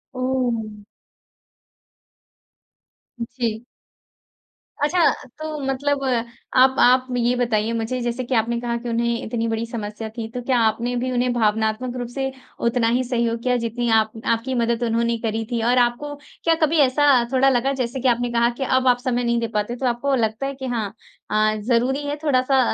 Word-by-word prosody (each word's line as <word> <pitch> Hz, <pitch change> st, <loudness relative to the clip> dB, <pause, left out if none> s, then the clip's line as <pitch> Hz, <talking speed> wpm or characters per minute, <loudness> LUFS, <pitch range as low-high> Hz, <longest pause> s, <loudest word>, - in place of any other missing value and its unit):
ओह! 240 Hz, -5 st, -2 dB, 2.4 s
जी। 235 Hz, -1 st, -3 dB, 1.2 s
अच्छा 345 Hz, +5 st, +2 dB, 0.4 s
तो 310 Hz, -1 st, -4 dB
मतलब 275 Hz, +1 st, 0 dB, 0.5 s
आप 260 Hz, +1 st, +6 dB
आप 255 Hz, +1 st, +5 dB
ये 240 Hz, +1 st, +2 dB
बताइए 230 Hz, -2 st, 0 dB
मुझे 230 Hz, +3 st, -2 dB
जैसे 240 Hz, +1 st, -2 dB
कि 250 Hz, +1 st, -2 dB
आपने 235 Hz, +1 st, +1 dB
कहा 240 Hz, -1 st, -2 dB
कि 240 Hz, +1 st, -6 dB
उन्हें 235 Hz, +1 st, 0 dB
इतनी 230 Hz, 0 st, -2 dB
बड़ी 225 Hz, 0 st, -1 dB
समस्या 220 Hz, -1 st, -5 dB
थी 225 Hz, -, -3 dB
तो 250 Hz, -, -5 dB
क्या 250 Hz, 0 st, +1 dB
आपने 235 Hz, +3 st, 0 dB
भी 255 Hz, +1 st, -1 dB
उन्हें 245 Hz, 0 st, +1 dB
भावनात्मक 220 Hz, +2 st, 0 dB
रूप 245 Hz, -1 st, -3 dB
से 270 Hz, -1 st, -1 dB, 0.4 s
उतना 235 Hz, -1 st, +2 dB
ही 255 Hz, -, 0 dB
सहयोग 235 Hz, -2 st, -1 dB
किया 250 Hz, -1 st, +2 dB
जितनी 235 Hz, +1 st, -2 dB
आप 220 Hz, 0 st, -1 dB, 0.2 s
आपकी 230 Hz, +3 st, -3 dB
मदद 235 Hz, 0 st, 0 dB
उन्होंने 235 Hz, 0 st, +1 dB
करी 225 Hz, -1 st, -2 dB
थी? 235 Hz, -, 0 dB
और 240 Hz, +2 st, +2 dB
आपको 245 Hz, +4 st, +1 dB, 0.3 s
क्या 330 Hz, -1 st, +4 dB
कभी 320 Hz, +2 st, 0 dB
ऐसा 275 Hz, -2 st, +4 dB
थोड़ा 265 Hz, +1 st, +5 dB
लगा 265 Hz, +2 st, +1 dB
जैसे 250 Hz, +2 st, -3 dB
कि 260 Hz, -, +1 dB
आपने 240 Hz, 0 st, +1 dB
कहा 235 Hz, 0 st, +3 dB
की -, -, 0 dB
अब 260 Hz, 0 st, +2 dB
आप 245 Hz, -, +5 dB
समय 245 Hz, -2 st, 0 dB
नहीं 235 Hz, 0 st, +1 dB
दे 230 Hz, -, -1 dB
पाते 210 Hz, +3 st, -1 dB
तो 255 Hz, +1 st, -4 dB
आपको 250 Hz, +3 st, +1 dB
लगता 220 Hz, +2 st, -1 dB
है 275 Hz, -, -2 dB
कि 265 Hz, 0 st, -7 dB
हाँ, 220 Hz, -5 st, -2 dB, 0.4 s
अ, 215 Hz, 0 st, +2 dB
ज़रूरी 260 Hz, +4 st, +1 dB
है 290 Hz, -, -1 dB
थोड़ा-सा 265 Hz, -2 st, +3 dB
240 Hz, 175 wpm, -22 LUFS, 230-260 Hz, 2.4 s, आप